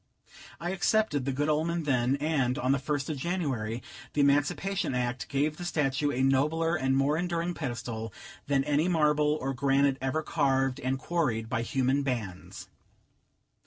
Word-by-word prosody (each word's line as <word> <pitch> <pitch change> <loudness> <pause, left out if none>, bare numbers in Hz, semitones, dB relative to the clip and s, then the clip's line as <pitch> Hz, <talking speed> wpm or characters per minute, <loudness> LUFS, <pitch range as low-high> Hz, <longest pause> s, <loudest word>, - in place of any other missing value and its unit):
I 175 +1 -3
accepted 190 -7 +1
the 135 - 0
good 145 +3 -1
omen 160 +2 0
then, 130 -2 +2
and, 140 -3 0
on 130 -3 +1
the 140 - +2
first 140 +1 -2
of 155 - -3
January, 130 -9 -2 0.3
the 150 - +2
Emancipation 145 +4 +1
Act 125 -1 -2
gave 145 +2 0
the 175 - -6
statue 145 -4 0
a 130 -1 0
nobler 155 +5 +2
and 135 -3 +1
more 140 +3 +2
enduring 175 0 -1
pedestal 120 -6 -4 0.4
than 140 -1 +2
any 150 +3 +1
marble 150 -3 +2
or 135 +1 -2
granite 135 +1 +2
ever 135 +4 -1
carved 135 -4 +1
and 130 +1 -1
quarried 125 -8 -1
by 115 - 0
human 135 +3 +1
hands. 115 -9 -4
140 Hz, 160 wpm, -29 LUFS, 130-155 Hz, 0.4 s, then